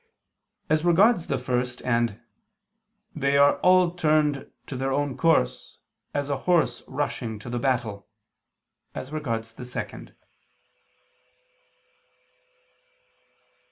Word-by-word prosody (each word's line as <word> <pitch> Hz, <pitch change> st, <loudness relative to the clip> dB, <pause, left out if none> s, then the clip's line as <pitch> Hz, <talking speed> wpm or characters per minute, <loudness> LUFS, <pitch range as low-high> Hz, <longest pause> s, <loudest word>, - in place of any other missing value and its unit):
as 155 Hz, 0 st, +2 dB
regards 175 Hz, +2 st, +4 dB
the 140 Hz, -, 0 dB
first; 125 Hz, 0 st, -2 dB
and, 115 Hz, -3 st, 0 dB, 1.0 s
"They 140 Hz, -2 st, +2 dB
are 140 Hz, 0 st, +5 dB
all 180 Hz, -1 st, +5 dB
turned 155 Hz, -4 st, +1 dB, 0.2 s
to 135 Hz, -, -7 dB
their 135 Hz, +1 st, -1 dB
own 145 Hz, 0 st, 0 dB
course, 65 Hz, -, +1 dB, 0.3 s
as 145 Hz, -1 st, -2 dB
a 140 Hz, -1 st, -1 dB
horse 155 Hz, -9 st, +3 dB
rushing 130 Hz, -5 st, -3 dB
to 120 Hz, +3 st, -9 dB
the 120 Hz, -, -1 dB
battle," 115 Hz, -7 st, -1 dB, 0.9 s
as 130 Hz, -, -6 dB
regards 115 Hz, -7 st, -3 dB
the 125 Hz, -, -9 dB
second. 125 Hz, -, -7 dB
135 Hz, 105 wpm, -25 LUFS, 120-155 Hz, 1.0 s, are